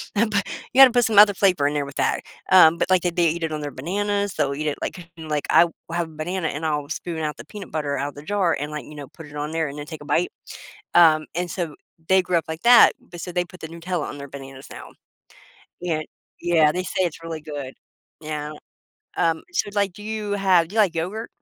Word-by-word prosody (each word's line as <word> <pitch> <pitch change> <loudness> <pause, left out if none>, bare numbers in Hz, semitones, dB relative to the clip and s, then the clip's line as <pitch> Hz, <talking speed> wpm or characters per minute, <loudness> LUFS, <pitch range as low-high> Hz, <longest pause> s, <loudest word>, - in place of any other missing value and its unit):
p 210 -1 +2 0.3
you 270 - +7
gotta 265 - +10
put 245 -1 +3
some 220 -2 0
other 205 -1 +8
flavor 185 -7 +2
in 145 - -1
there 145 -1 -1
with 140 - -10
that. - - 0 0.3
Um, 170 -3 +7
but - - -1
like 185 -1 +4
they 175 - +1
they 170 -1 +2
eat 170 +1 -3
it 160 - -1
on 155 -1 -3
their 145 -1 -4
bananas, 200 +7 -2
they'll 140 -2 0
eat 155 +2 -3
it 145 - -1
like 175 -2 -6
like, 155 -2 -3
I - - +7
will 170 - -9 0.2
have 170 -1 -1
a 155 - -16
banana 170 +2 -2
and 155 +3 -4
I'll 150 -2 -1
spoon 165 +1 -4
out 150 -1 -3
the - - -10
peanut 205 -3 -10
butter 145 -2 -2
out 140 - -2
of - - -15
the 145 - -10
jar 185 -1 +1
and, 145 +2 -4
like, 150 -1 -6
you 150 - -12
know, 145 -2 -8
put 165 - -13
it 145 0 -13
on 150 +1 -3
there 160 -1 -1
and 140 - -8
then 145 - -6
take 155 -1 -9
a - - -10
bite. 160 +4 +1 0.6
Um, 155 -3 +6
and 175 +1 -2
so, 165 -4 -4 0.3
they 190 0 +5
grew 180 -1 0
up 165 - +1
like 160 +1 -6
that, 240 -1 +8
but 175 0 -12
so 180 - -6
they 180 0 0
put 180 +1 -15
the 160 - -7
Nutella 170 0 -4
on 145 - -7
their 140 0 -8
bananas 135 -1 -10
now. - - -10 0.9
Yeah, 165 -3 -1 0.4
yeah, 165 -3 +4
they 180 +3 -2
say 185 - -2
it's 165 -2 -3
really 165 -1 -5
good. 145 -4 -7 0.5
Yeah. 150 -1 -5 0.6
Um, 165 -1 +1
so 275 - -1
like, 200 -2 +1
do 205 - -11
you 215 -1 -4
have 190 -4 +3
do 195 - -12
you - - -1
like 195 -5 +3
yogurt? 185 +7 -3
165 Hz, 255 wpm, -23 LUFS, 150-185 Hz, 0.9 s, gotta